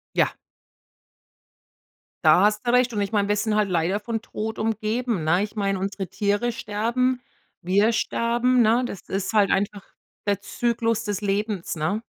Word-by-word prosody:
Ja. -, -, +2 dB, 1.9 s
Da -, -, +6 dB
hast 210 Hz, +2 st, +1 dB
du 240 Hz, -, +2 dB
recht. 250 Hz, -1 st, +3 dB
Und 210 Hz, -, -1 dB
ich 200 Hz, -, -2 dB
meine, 205 Hz, -2 st, +1 dB
wir 205 Hz, -, +2 dB
sind 210 Hz, +1 st, 0 dB
halt 210 Hz, -2 st, +2 dB
leider 180 Hz, +3 st, +1 dB
von 225 Hz, +1 st, -3 dB
Tod 220 Hz, -1 st, -5 dB
umgeben, 220 Hz, -2 st, -1 dB
ne? 175 Hz, +5 st, +2 dB
Ich 210 Hz, +1 st, -6 dB
meine, 195 Hz, -2 st, 0 dB
unsere 195 Hz, 0 st, -3 dB
Tiere 205 Hz, +6 st, 0 dB
sterben, 235 Hz, +4 st, -1 dB, 0.4 s
wir 200 Hz, +5 st, +3 dB
sterben, 240 Hz, +2 st, +1 dB
ne, 230 Hz, +2 st, +3 dB
das 200 Hz, -6 st, -6 dB
ist 195 Hz, +2 st, -2 dB
halt 205 Hz, -2 st, +4 dB
einfach 200 Hz, +1 st, 0 dB, 0.5 s
der 200 Hz, -1 st, +1 dB
Zyklus 230 Hz, 0 st, -1 dB
des 205 Hz, -2 st, -3 dB
Lebens, 205 Hz, -2 st, -2 dB
ne? 165 Hz, +8 st, -1 dB
210 Hz, 165 wpm, -24 LUFS, 200-230 Hz, 1.9 s, Da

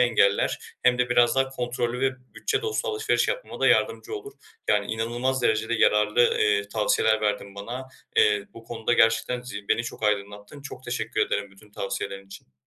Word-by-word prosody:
engeller 115 Hz, -5 st, +3 dB, 0.2 s
hem 125 Hz, 0 st, +4 dB
de 125 Hz, 0 st, +2 dB
biraz 120 Hz, 0 st, +4 dB
daha 135 Hz, 0 st, +3 dB
kontrollü 125 Hz, -1 st, -3 dB
ve 135 Hz, 0 st, +3 dB, 0.2 s
bütçe 430 Hz, 0 st, -1 dB
dostu 445 Hz, +2 st, -2 dB
alışveriş 435 Hz, -1 st, +1 dB
yapmama -, -, -4 dB
da -, -, +3 dB
yardımcı -, -, +2 dB
olur. 415 Hz, 0 st, -7 dB, 0.4 s
Yani, 100 Hz, -1 st, +2 dB
inanılmaz 120 Hz, +4 st, -1 dB
derecede 110 Hz, 0 st, +1 dB
yararlı, 105 Hz, +1 st, +3 dB, 0.2 s
eee, 100 Hz, -1 st, +2 dB
tavsiyeler 110 Hz, +1 st, +2 dB
verdin 105 Hz, -2 st, -2 dB
bana. 120 Hz, +6 st, -6 dB, 0.3 s
Eee, -, -, +7 dB, 0.3 s
bu 115 Hz, -, -12 dB
konuda 115 Hz, 0 st, -2 dB
gerçekten 115 Hz, +1 st, +3 dB
zi 100 Hz, -5 st, -8 dB
beni 115 Hz, -, +2 dB
çok -, -, -8 dB
aydınlattın. 105 Hz, +5 st, -2 dB
Çok 130 Hz, -2 st, -9 dB
teşekkür -, -, -2 dB
ederim 100 Hz, -1 st, 0 dB
bütün 100 Hz, +2 st, -19 dB
tavsiyelerin 100 Hz, 0 st, -4 dB
için. 95 Hz, -9 st, -14 dB
115 Hz, 170 wpm, -25 LUFS, 105-130 Hz, 0.4 s, Eee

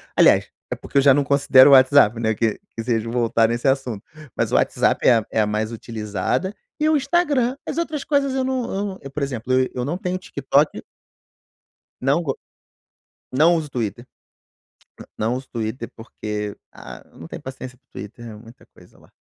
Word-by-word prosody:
aliás, -, -, +4 dB, 0.2 s
é -, -, -1 dB
porque -, -, -5 dB
eu -, -, +6 dB
já 135 Hz, 0 st, +6 dB
não 145 Hz, +1 st, +2 dB
considero 140 Hz, -1 st, +6 dB
o -, -, +8 dB
WhatsApp, 130 Hz, -4 st, +6 dB
né, 110 Hz, -1 st, +1 dB
que 110 Hz, -1 st, -1 dB, 0.2 s
que 115 Hz, -, -3 dB
seja 115 Hz, -1 st, -1 dB
voltar 115 Hz, -1 st, +2 dB
nesse 120 Hz, +3 st, -1 dB
assunto, 130 Hz, -6 st, -1 dB, 0.3 s
mas -, -, -1 dB
o -, -, +1 dB
WhatsApp -, -, +1 dB
é 120 Hz, -, +7 dB
a 110 Hz, -, -2 dB
é 110 Hz, -, +2 dB
a 105 Hz, -, +1 dB
mais 110 Hz, +2 st, -2 dB
utilizada 110 Hz, -, -3 dB, 0.3 s
e 305 Hz, -, +2 dB
o 315 Hz, -, +3 dB
Instagram, 280 Hz, -4 st, +1 dB
as -, -, -4 dB
outras 305 Hz, -4 st, -2 dB
coisas 280 Hz, -2 st, +1 dB
eu 265 Hz, -1 st, 0 dB
não 260 Hz, -1 st, -1 dB
eu 195 Hz, +1 st, -2 dB
não 190 Hz, -2 st, -6 dB
eu, 140 Hz, -, -9 dB
por 150 Hz, -, -5 dB
exemplo, 130 Hz, -3 st, -4 dB
eu 130 Hz, 0 st, +3 dB
eu 125 Hz, -1 st, -2 dB
não 160 Hz, +6 st, -2 dB
tenho 180 Hz, 0 st, -3 dB
TikTok. 145 Hz, -3 st, 0 dB, 1.2 s
Não 140 Hz, +6 st, +1 dB
go 140 Hz, -5 st, -3 dB, 1.0 s
Não 160 Hz, +6 st, +4 dB
uso 155 Hz, -2 st, -3 dB
Twitter. 120 Hz, -2 st, -4 dB, 1.1 s
Não 115 Hz, +3 st, 0 dB
uso 130 Hz, +1 st, -7 dB
Twitter, 115 Hz, +2 st, -4 dB
porque, 105 Hz, -2 st, -6 dB, 0.2 s
ah, -, -, -11 dB
eu -, -, -20 dB
não -, -, -9 dB
tenho -, -, -8 dB
paciência 130 Hz, -1 st, -9 dB
para 135 Hz, -, -46 dB
o -, -, -70 dB
Twitter, 105 Hz, +3 st, -9 dB
é 110 Hz, -, -9 dB
muita 115 Hz, +3 st, -16 dB
coisa -, -, -20 dB
lá. -, -, -22 dB
130 Hz, 200 wpm, -21 LUFS, 115-170 Hz, 1.2 s, o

